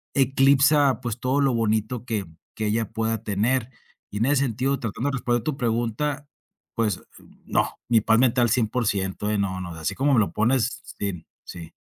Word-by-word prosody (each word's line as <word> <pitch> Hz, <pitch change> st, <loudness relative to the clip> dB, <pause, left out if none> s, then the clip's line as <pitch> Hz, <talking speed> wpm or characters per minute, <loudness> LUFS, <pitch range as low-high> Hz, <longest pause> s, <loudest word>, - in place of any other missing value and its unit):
eclipsa, 135 Hz, 0 st, +4 dB
pues, 120 Hz, -2 st, -4 dB
todo 130 Hz, +2 st, +1 dB
lo 135 Hz, -2 st, +2 dB
bonito 110 Hz, +1 st, 0 dB
que 110 Hz, -5 st, -2 dB, 0.3 s
que 110 Hz, -, -3 dB
ella 110 Hz, 0 st, 0 dB
pueda 115 Hz, 0 st, -2 dB
tener 115 Hz, +4 st, 0 dB, 0.4 s
y 105 Hz, -, -5 dB
en 115 Hz, -, +2 dB
ese 145 Hz, 0 st, +3 dB
sentido, 130 Hz, +4 st, -1 dB
tratando 115 Hz, +3 st, -3 dB
de -, -, -4 dB
responder 120 Hz, -2 st, 0 dB
a -, -, -17 dB
tu 155 Hz, -3 st, -1 dB
pregunta, 120 Hz, +4 st, -1 dB, 0.5 s
pues, 110 Hz, -5 st, +1 dB, 0.2 s
eh, -, -, -19 dB, 0.2 s
no, -, -, 0 dB
mi 115 Hz, -2 st, +5 dB
paz 115 Hz, +2 st, +3 dB
mental 125 Hz, -2 st, +3 dB
100%. 105 Hz, -3 st, 0 dB
No, 95 Hz, -2 st, -1 dB
no, 90 Hz, -1 st, -6 dB
así 80 Hz, +5 st, -3 dB
como 140 Hz, +2 st, +2 dB
me 120 Hz, -, +5 dB
lo 95 Hz, -, -1 dB
pones. 120 Hz, +2 st, +1 dB, 0.2 s
Sí, 100 Hz, -1 st, -1 dB
mm, 85 Hz, -, -10 dB, 0.2 s
sí. 85 Hz, -2 st, -9 dB
115 Hz, 185 wpm, -24 LUFS, 105-130 Hz, 0.5 s, mi